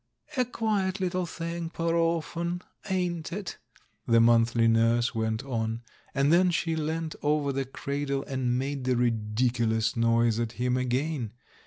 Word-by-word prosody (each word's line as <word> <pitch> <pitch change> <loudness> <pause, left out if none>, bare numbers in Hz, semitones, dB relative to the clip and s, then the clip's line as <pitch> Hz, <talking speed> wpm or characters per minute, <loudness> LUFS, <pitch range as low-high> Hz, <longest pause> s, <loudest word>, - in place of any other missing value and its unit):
"A 255 -2 +2
quiet 210 -5 -1
little 180 -1 -1
thing, 170 0 -4
poor 165 0 -1
orphan, 170 +1 0 0.3
ain't 175 -3 -1
it?" 195 +1 -5 0.5
the 115 0 +5
monthly 115 0 +4
nurse 115 +2 +3
went 110 0 -1
on; 115 -3 -2 0.3
and 140 +3 +3
then 180 +1 +5
she 165 -1 0
leant 160 +1 -2
over 145 -1 +1
the 135 0 -1
cradle 140 +1 -3
and 130 -2 -1
made 135 0 -3
the 130 -1 +2
ridiculous 115 0 +1
noise 115 -1 +3
at 115 -1 -2
him 125 +1 0
again. 130 -1 -1
135 Hz, 145 wpm, -28 LUFS, 115-165 Hz, 0.5 s, the